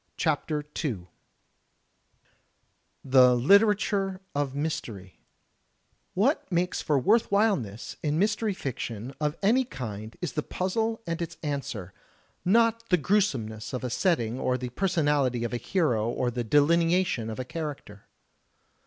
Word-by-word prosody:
CHAPTER 150 -1 0 0.2
II 110 - -3 2.0
THE 130 -2 +6
LITERATURE 195 - +3
OF 140 -2 -2
MYSTERY 105 - -4 1.0
What 225 - +1
makes 180 +1 0
for 145 -3 +1
worthwhileness 200 - +1
in 150 0 0
mystery 205 +2 +1
fiction 120 - -5
of 150 +1 -1
any 240 +6 +4
kind 110 - -7
is 175 -4 -4
the 150 - -1
puzzle 220 +8 -2
and 170 0 -3
its 170 0 -5
answer 135 - -4 0.3
— - - -36 0.2
^not 230 +3 +4
the 180 - +5
gniesomeness 135 - 0
of 125 - -5
a 125 - -3
setting 125 - 0
or 125 -1 0
the 125 0 -5
personality 145 -6 +1
of 120 - -3
a - - 0
hero 120 - 0
or 120 +1 -1
the 120 0 -2
delineation 165 -1 +2
of 110 - -6
a 130 - -3
character. 145 -10 -7
150 Hz, 130 wpm, -27 LUFS, 120-185 Hz, 2.0 s, THE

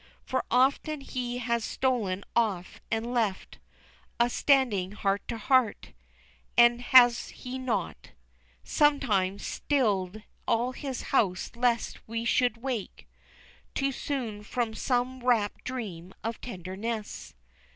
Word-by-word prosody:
For 260 - -1
often 275 +4 +2
has - - -13
he 245 -2 -1
stolen 215 -5 -1
off 205 -6 0
and 230 +2 -2
left 215 -6 -1 0.6
Us 240 0 +3
standing 225 -10 +2
heart 200 -1 0
to 230 - -3
heart, 255 0 +1 0.6
And 240 0 +6
has 245 -1 +6
he 255 +1 -7
not 225 - -3 0.5
Sometimes, 215 -11 +2
stilled 210 -7 0 0.2
all 240 +2 +2
his 265 -1 -5
house 190 -8 +2
lest 235 -1 0
we 230 +1 -3
should 245 -1 +2
wake 240 -4 -5 0.7
Too 275 0 +1
soon 245 -6 -3
from 230 +1 -2
some 250 +2 -1
wrapt 230 -5 +1
dream 190 -9 -6
of 225 +1 -4
tenderness? 210 +2 -5
235 Hz, 115 wpm, -28 LUFS, 210-255 Hz, 0.7 s, And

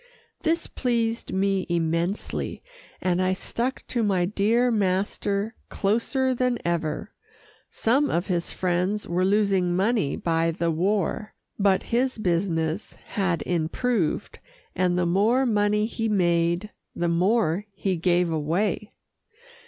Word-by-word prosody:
This 330 0 +1
pleased 230 -2 -1
me 195 0 0
immensely, 170 +3 -1 0.4
and 180 0 +1
I 185 0 +2
stuck 235 +6 -3
to 240 - 0
my 190 -5 +2
dear 220 +6 +2
master 200 +1 0 0.2
closer 235 +6 +1
than 250 -1 +1
ever. 170 +2 -2 0.6
Some 275 +6 +1
of 175 +2 0
his 175 -3 -1
friends 185 +3 -1
were 175 +2 0
losing 195 -3 +2
money 195 - +1
by 165 0 +1
the 165 +1 0
war, 195 +4 -1 0.2
but 195 -2 +3
his 255 +2 0
business 170 -2 -1
had 185 -6 -2
improved, 175 +3 -1 0.4
and 180 -1 +1
the 180 - +2
more 215 +9 +3
money 210 -2 +2
he 225 0 -2
made, 175 0 +1 0.2
the 175 - 0
more 185 +2 +1
he 195 -1 -1
gave 175 0 +2
away. 175 +7 -1
195 Hz, 120 wpm, -25 LUFS, 175-215 Hz, 0.6 s, but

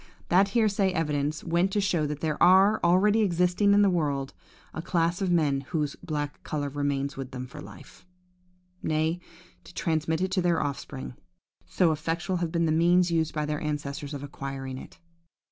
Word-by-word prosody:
That 190 +3 +5
hearsay 200 -4 +2
evidence 150 -2 -1
went 175 +3 +1
to 210 - +2
show 175 -6 +1
that 150 0 -5
there 155 -2 -2
are, 190 +4 +6
already 200 +5 +4
existing 180 +1 +2
in 205 - +5
the - - +5
world, 145 -6 -1 0.4
a 160 - -4
class 170 +1 0
of 190 - 0
men 150 -6 +2
whose 150 -4 -1
black 150 -4 -4
colour 145 -2 -3
remains 140 -1 -2
with 135 -2 -5
them 130 -1 -6
for 130 +4 -10
life,–nay, 180 -2 -6
who 175 +1 -20
transmit 160 -1 -1
it 185 0 -1
to 190 -1 +1
their 175 -1 +2
offspring, 140 -2 -5 0.5
so 175 -3 +2
effectual 165 +4 -2
have 170 -2 -2
been 170 0 +1
the 160 - +1
means 175 +2 +3
used 160 -2 0
by 150 -1 -1
their 150 0 -3
ancestors 145 -1 -4
in 140 - -7
acquiring 135 -2 -6
it! - - -13
165 Hz, 175 wpm, -27 LUFS, 145-180 Hz, 0.5 s, are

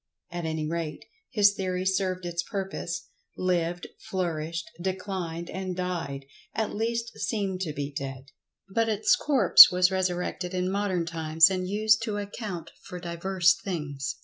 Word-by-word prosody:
At 175 -1 -4
any 160 -1 -2
rate, 160 -2 -4 0.2
his 205 -4 +4
theory 185 -2 -2
served 185 -1 0
its 170 0 -2
purpose—lived, 175 -2 -3 0.2
flourished, 165 -2 -3
declined 185 -3 -3
and 185 -1 -4
died[Pg 165 -7 -3 0.3
98]—at 220 -1 -1
least 230 +1 -2
seemed 195 -4 -2
to 165 -5 -2
be 145 0 -4
dead. 135 0 -6 0.4
But 225 +4 0
its 215 0 +3
corpse 255 - +8
was 180 +1 +3
resurrected 180 -1 -2
in 185 0 0
modern 195 -4 0
times, 160 +1 +4
and 185 -1 -2
used 215 +2 +3
to 210 -3 -2
account 200 -4 -6
for 180 - -8
divers 175 +1 +2
things. 145 -6 -4
180 Hz, 140 wpm, -27 LUFS, 165-195 Hz, 0.4 s, corpse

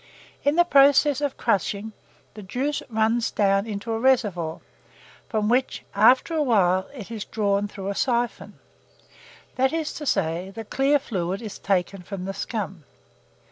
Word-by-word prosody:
In 285 +1 +2
the 345 0 +5
process 285 -1 +5
of 285 -2 -2
crushing, 210 0 -1 0.4
the 215 - -9
juice 260 +9 -2
runs 225 +1 +1
down 195 +1 +1
into 215 +1 -4
a 225 - -1
reservoir, 210 -11 +1 0.7
from 215 -2 0
which, 250 +3 0
after 250 +10 +4
a 315 - +1
while, 190 -8 +2
it 235 -6 -10
is 220 -3 -4
drawn 205 -2 0
through 195 -1 -6
a - - -1
siphon; 240 +2 -1 1.0
that 265 +1 +3
is 320 -2 -2
to 295 - -6
say, 180 -2 0
the 220 +3 -8
clear 275 +6 +2
fluid 190 -8 -3
is 220 -4 -8
taken 195 0 -1
from 185 0 -7
the 195 - -4
scum. 195 -6 -5
220 Hz, 155 wpm, -24 LUFS, 195-260 Hz, 1.0 s, the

